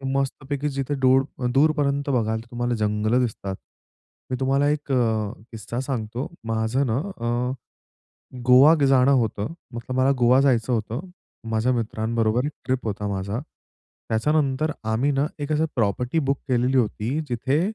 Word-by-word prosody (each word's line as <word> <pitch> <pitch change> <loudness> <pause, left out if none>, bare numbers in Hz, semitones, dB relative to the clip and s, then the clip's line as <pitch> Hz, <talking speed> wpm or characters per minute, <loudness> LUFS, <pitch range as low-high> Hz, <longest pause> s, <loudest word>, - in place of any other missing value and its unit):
मस्तपैकी 140 +1 -2
जिथे 140 0 -3
डुर 130 +1 +5 0.2
अ, 125 - -2
दूरपर्यंत 140 -1 +2
बघाल 110 -4 +1
तर - - -16
तुम्हाला 120 0 -1
जंगलं 105 +2 +1
दिसतात. 105 -5 -2 0.8
मी - - +1
तुम्हाला 135 +2 +2
एक 150 -1 -2
अ, 110 -4 +1 0.2
किस्सा 115 +1 -5
सांगतो, 125 0 -3 0.2
माझं 115 +5 0
ना, 115 0 0
अ, 125 -7 -2 1.0
गोवा 130 +6 +8
जाणं 135 0 +5
होतं. 110 +4 -3 0.2
मतलब 120 +2 -5
मला 130 +1 +4
गोवा 125 +2 +5
जायचं 125 -3 +2
होतं, 115 +2 -1 0.5
माझ्या 115 +3 +1
मित्रांबरोबर 115 +1 0
एक 150 - -3
ट्रिप 130 -1 -1
होता 105 -1 -3
माझा. 100 +3 -3 0.7
त्याच्यानंतर 145 +5 +1 0.2
आम्ही 130 +6 +1
ना, 140 +1 +1
एक 145 +1 -3
असं 155 +1 +2
प्रॉपर्टी 120 +6 0
बुक 140 -3 0
केलेली 125 +1 +2
होती 120 +2 0
जिथे, 130 +5 0
125 Hz, 145 wpm, -24 LUFS, 110-140 Hz, 1.0 s, गोवा